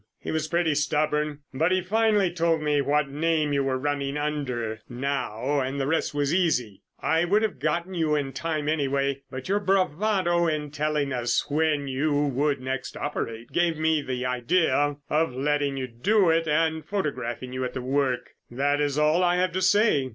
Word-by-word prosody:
He - - -5
was 160 -1 -1
pretty 170 -1 +1
stubborn, 150 0 0
but 160 +7 +1
he 185 0 +2
finally 210 -1 +2
told 165 -1 +1
me 150 -1 +2
what 145 +1 +1
name 155 +1 0
you 140 -1 +2
were 135 -1 0
running 140 0 -2
under 130 -7 -2
now, 135 +1 -2
and 135 +1 -2
the 135 - 0
rest 160 +3 0
was 145 +1 0
easy. 125 - 0 0.2
I 165 +1 +2
would 205 +5 +2
have 220 - -2
got 160 +4 0
you 160 -3 +1
in 140 -2 -2
time 155 -2 -2
anyway, 140 -2 0
but 130 0 -7
your 200 +2 +2
bravado 185 -2 +1
in 150 -2 -2
telling 150 -2 -1
us 120 -1 0
when 150 -2 +1
you 140 +3 0
would 140 +1 0
next 130 0 -4
operate 115 -5 -4
gave 170 -2 +1
me 160 -1 +2
the 125 -2 -3
idea 145 +3 +1
of 155 -3 0
letting 145 0 0
you 130 - -2
do 175 - +2
it 165 0 +1
and 160 +1 +1
photographing 130 -9 -3
you 130 0 -2
at 125 - -4
work. 130 0 -1 0.2
That 145 +4 0
is 145 -1 0
all 155 +4 +3
I 175 0 +3
have 180 0 +1
to 185 +2 -2
say. 190 -8 +3
150 Hz, 180 wpm, -26 LUFS, 135-165 Hz, 0.2 s, all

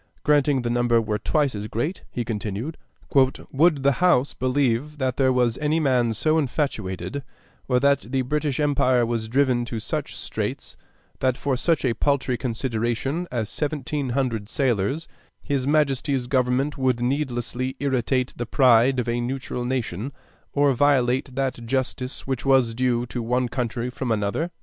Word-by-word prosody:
Granting 145 -3 +3
the 120 - -1
number 120 -1 +3
were 105 -1 -1
twice 150 -4 +1
as 105 0 -4
great, 145 - -3
he 120 - -3
continued, 110 +6 -4 0.4
"would 140 +2 +2
the 140 - +5
House 145 -7 +4
believe 130 +2 0
that 130 -2 -1
there 130 -1 +3
was 125 -2 +1
any 150 +2 +1
man 125 -6 +2
so 155 +8 +2
infatuated, 135 - -2 0.5
or 125 -1 +3
that 140 +1 +4
the 135 -1 +1
British 150 +1 -1
empire 130 -4 +3
was 115 -1 -2
driven 130 0 +2
to 115 - -5
such - - -4
straits - - -4 0.4
that 130 -1 +1
for 140 -2 0
such 160 +3 +1
a 120 - +2
paltry 140 -1 +1
consideration 120 +6 -2
as 115 -4 -1
seventeen 145 0 -2
hundred 115 -6 -1
sailors, 130 +4 0 0.4
his 140 -3 -1
Majesty's 140 -3 +1
government 130 +3 0
would 130 -2 +1
needlessly 125 -1 -2
irritate 130 -2 0
the 120 - -4
pride 130 0 +4
of 125 - -1
a 120 +1 0
neutral 125 0 -3
nation 125 -2 -2 0.4
or 140 -1 +3
violate 130 -1 +2
that 135 -3 -2
justice 130 0 -2
which 130 -2 -2
was 130 -4 +3
due 120 0 +1
to 120 0 -4
one 125 +2 0
country 120 0 -3
from 125 -1 -3
another?" 105 - 0
130 Hz, 155 wpm, -24 LUFS, 120-140 Hz, 0.5 s, the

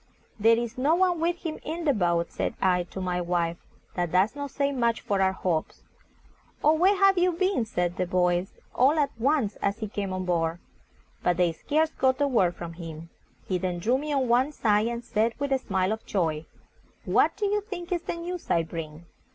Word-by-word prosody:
"There 225 +2 +5
is 235 +1 -4
no 295 +5 +3
one 360 -1 +2
with 345 +2 -1
him 315 -1 -3
in 330 +2 -5
the 290 - +4
boat," 170 -5 0
said - - -2
I 180 -2 +2
to 190 - -8
my 180 -1 -1
wife; 170 -1 -1 0.4
"that 175 -2 -2
does 190 +7 +2
not 285 0 -4
say 280 +1 0
much 235 -4 +1
for 200 -1 -1
our 190 0 +3
hopes." 175 -4 -2 0.8
"Oh, 305 - +6
where 370 +6 +4
have 390 -1 +4
you 360 0 +3
been?" 370 - +1
said 180 -4 -2
the 185 - -1
boys, 180 0 +1 0.2
all 275 +5 +4
at 290 -2 +2
once, 260 -4 +1
as 200 +1 -1
he 220 - -4
came 200 -1 -4
on 185 0 -3
board. 165 -2 0 0.6
But 175 -1 +1
they 175 -2 +3
scarce 310 - 0
got 260 -2 +1
a 285 - +3
word 185 -10 +2
from 170 -1 -7
him. 165 -1 -9 0.4
He 185 -2 0
then 180 -1 -2
drew 240 +9 +1
me 300 +1 -4
on 270 -3 +1
one 250 +5 +3
side, 215 -4 +2
and 235 0 -4
said, 225 +1 0
with 285 -1 -3
a 270 - +3
smile 190 -5 0
of 220 0 -3
joy, 160 -5 -1 0.6
"What - - +2
do 415 - -1
you 415 +1 +1
think 375 -4 -7
is 350 -2 0
the - - -4
news 345 +1 -6
I 165 - +3
bring?" 160 0 -7
220 Hz, 215 wpm, -27 LUFS, 180-295 Hz, 0.8 s, Oh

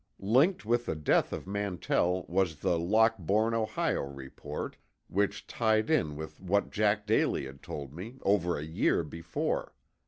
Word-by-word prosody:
Linked 130 - +3
with 120 +2 +1
the - - -1
death 75 -1 +2
of - - -5
Mantell 95 -2 0
was 85 -4 0
the 85 - +2
Lockbourne, 110 +2 +2
Ohio, 110 -1 0
report, 70 -1 -6 0.3
which 100 +2 0
tied 110 +2 +1
in 80 - +2
with 80 +1 -8
what 100 +2 +1
Jack 105 0 +1
Daly 105 -9 +2
had 70 +1 -10
told 70 -2 -7
me, 105 +10 -8
over 90 -3 +2
a 75 - -4
year 80 +1 +1
before. 80 +2 -3
95 Hz, 150 wpm, -30 LUFS, 80-110 Hz, 0.3 s, Linked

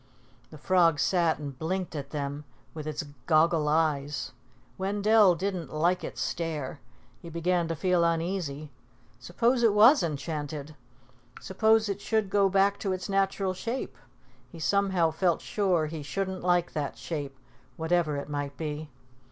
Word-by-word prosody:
The 155 - -11
frog 165 -1 +3
sat 170 -4 +2
and 140 -3 -7
blinked 180 +1 -3
at 140 -2 -5
them 145 0 -4 0.3
with 155 -1 -7
its 155 0 -3 0.2
goggle 160 -1 +3
eyes. 150 -2 0 0.5
Wendell 205 0 +4
didn't 180 -5 -3
like 175 +4 +1
its - - -5
stare. 155 -5 -3 0.4
He 170 - -9
began 170 +1 0
to 165 - -2
feel 180 +2 +2
uneasy. 165 -3 -2 0.5
Suppose 235 - +1
it 225 -3 +4
was 235 +7 +7
enchanted. 150 -1 -4 0.7
Suppose 220 +3 +2
it 200 0 -3
should 215 -3 0
go 200 -1 +4
back 195 +1 +2
to 195 -2 -1
its 185 +1 -5
natural 195 -1 0
shape. 230 - -4 0.6
He - - -11
somehow 190 -1 +2
felt 170 +1 +1
sure 185 -6 0
he 155 0 -6
shouldn't 190 +5 -3
like 175 -1 +1
that 145 -2 -3
shape, 145 -4 -5 0.4
whatever 160 -2 +1
it 140 - -5
might 145 -1 -4
be. 155 -1 -5
170 Hz, 145 wpm, -28 LUFS, 150-195 Hz, 0.7 s, was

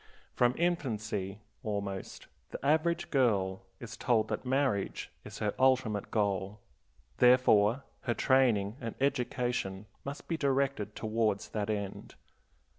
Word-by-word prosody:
From 125 +1 +3
infancy, 110 - -1 0.2
almost, 100 -4 -4 0.2
the - - -7
average 160 +3 +2
girl 100 -9 +2 0.2
is 120 +1 -8
told 110 -3 +1
that 105 - -2
marriage 130 -7 0
is 105 0 -9
her 105 -2 -1
ultimate 130 -6 +2
goal; 100 -1 -1 0.6
therefore 125 -1 +5 0.2
her 120 -3 +1
training 120 -5 +3
and 115 -2 -4
education 125 -7 -1 0.2
must 140 +1 -7
be 165 - -1
directed 135 -7 0
towards 110 -2 0
that 105 -1 -3
end. 100 -2 -4
115 Hz, 115 wpm, -31 LUFS, 105-130 Hz, 0.6 s, therefore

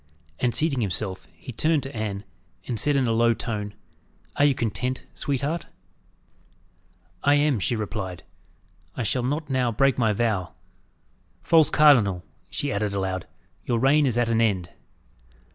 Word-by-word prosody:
And, 120 -2 +1
seating 150 -5 +1
himself, 95 -1 -3
he 130 - -10
turned 155 +4 +1
to 135 +1 -7
Anne, 105 -2 -3 0.4
and 115 -3 -3
said, 145 -1 +2
in 135 -2 +2
a - - +1
low 115 +1 +3
tone, 105 -2 -4 0.6
"Are 145 - +4
you 140 -2 +3
content, 125 +3 -2
sweetheart?" 145 +4 -2 1.6
"I 145 +1 +5
am," 145 -5 +2
she 120 - 0
replied. 100 -4 -4 0.7
"I 125 - -1
shall 125 +4 0
not 145 +5 -2
now 125 -2 +1
break 135 +4 +2
my 110 -3 +3
vow. 105 -4 -1 0.9
False 160 -2 +5
cardinal," 115 - +5 0.3
she 145 - -3
added 100 -2 -1
aloud, 95 -2 -2 0.4
"your 120 - 0
reign 140 +4 +4
is 120 -2 0
at 120 -1 +2
an 115 0 +2
end." 95 -6 0
120 Hz, 150 wpm, -25 LUFS, 105-140 Hz, 1.6 s, I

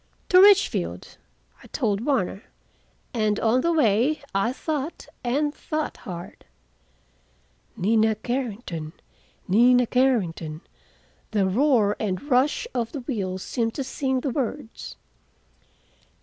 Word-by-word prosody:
"To 365 0 +7
Richfield," 400 0 +3 0.4
I - - -14
told 215 -5 -1
Warner, 230 -8 -1 0.7
and 215 -3 +1
on 230 +3 +2
the 340 - +1
way 280 0 +2
I 195 +5 +1
thought, 300 +3 -4 0.2
and 290 +5 0
thought 310 0 -4
hard. 175 -2 -9 1.3
"Nina 220 +2 +2
Carrington, 215 -10 -4 0.5
Nina 245 +5 +5
Carrington," 185 -12 0 0.7
the 205 -3 +1
roar 215 0 +3
and 190 -4 -1
rush 260 - +2
of 235 -2 -2
the 285 - -4
wheels 190 -7 -3
seemed 230 -3 -2
to 275 - -2
sing 265 0 -1
the 275 - -2
words. 265 -2 -5
240 Hz, 110 wpm, -24 LUFS, 205-275 Hz, 1.3 s, To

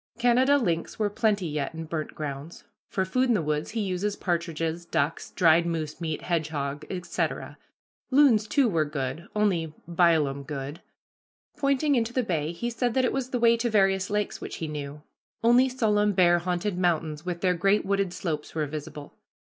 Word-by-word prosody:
Canada 250 +4 +4
lynx 170 -10 -1
were 210 -2 0
plenty 205 -3 +1
yet 150 -1 -3
in 165 - -5
burnt 155 -1 -4
grounds. 150 +2 -6 0.3
For 190 - 0
food 255 +7 +1
in 240 - +3
the 195 - +1
woods 150 0 -1
he 225 0 -2
uses 200 +1 -1
partridges, 170 -2 -2
ducks, 160 -2 -1
dried 170 -1 +4
moose 160 -1 -3
meat, 160 -2 -3
hedgehog, 150 -4 -2
etc. 180 -2 -3 0.5
Loons, 255 -6 +5
too, 275 +2 +3
were 165 -7 +2
good, 150 +4 -4
only 175 -7 +1
"bile 170 -3 +3
'em 135 +1 -5
good." 140 +2 -6 0.7
Pointing 285 0 +1
into 235 -2 0
the 255 - +1
bay 160 -7 -1
he 235 +8 -3
said 235 0 -1
that 260 -1 +3
it - - 0
was 265 -2 -2
the 250 - -1
way 235 0 +5
to 240 +1 0
various 195 -2 +2
lakes 210 0 -2
which - - -6
he 160 - -4
knew. 150 -1 -6 0.4
Only 245 +3 +5
solemn 210 -5 +2
bear 175 -2 +4
haunted 180 +2 -2
mountains 160 -4 0
with 175 -1 -4
their 185 -1 +3
great 195 +4 +2
wooded 200 -1 0
slopes 160 -5 -4
were 155 -1 0
visible. 150 0 -7
175 Hz, 180 wpm, -27 LUFS, 155-215 Hz, 0.7 s, Loons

